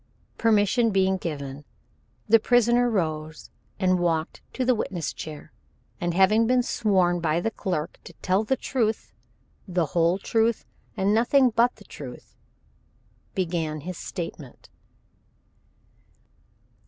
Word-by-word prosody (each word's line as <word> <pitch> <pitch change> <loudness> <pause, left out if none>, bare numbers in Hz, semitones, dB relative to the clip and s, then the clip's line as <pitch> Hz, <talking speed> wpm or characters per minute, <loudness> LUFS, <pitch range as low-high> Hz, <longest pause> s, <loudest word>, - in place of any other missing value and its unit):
Permission 225 +1 +3
being 190 -1 +2
given, 145 -5 -6 0.6
the 225 +1 +6
prisoner 245 +1 +3
rose 160 -6 -3 0.3
and 185 -2 +2
walked 165 -2 -1
to 255 - -2
the 255 - +4
witness 180 -7 -3
chair, 155 -2 -9 0.5
and 175 -1 -2
having 210 +4 +4
been 250 0 +3
sworn 185 -7 +1
by 165 -1 +1
the 225 +6 -1
clerk 175 -8 -4
to - - -11
tell 190 +3 0
the 245 +5 +1
truth, 225 -4 -2 0.5
the 180 -2 0
whole 170 +1 +3
truth, 225 +3 0 0.3
and 195 +2 +2
nothing 245 +3 +4
but 235 +2 +2
the 205 - -17
truth, 130 -8 -10 1.0
began 165 -4 -2
his 180 +4 -6
statement. 165 -7 -8
190 Hz, 120 wpm, -25 LUFS, 165-225 Hz, 1.0 s, the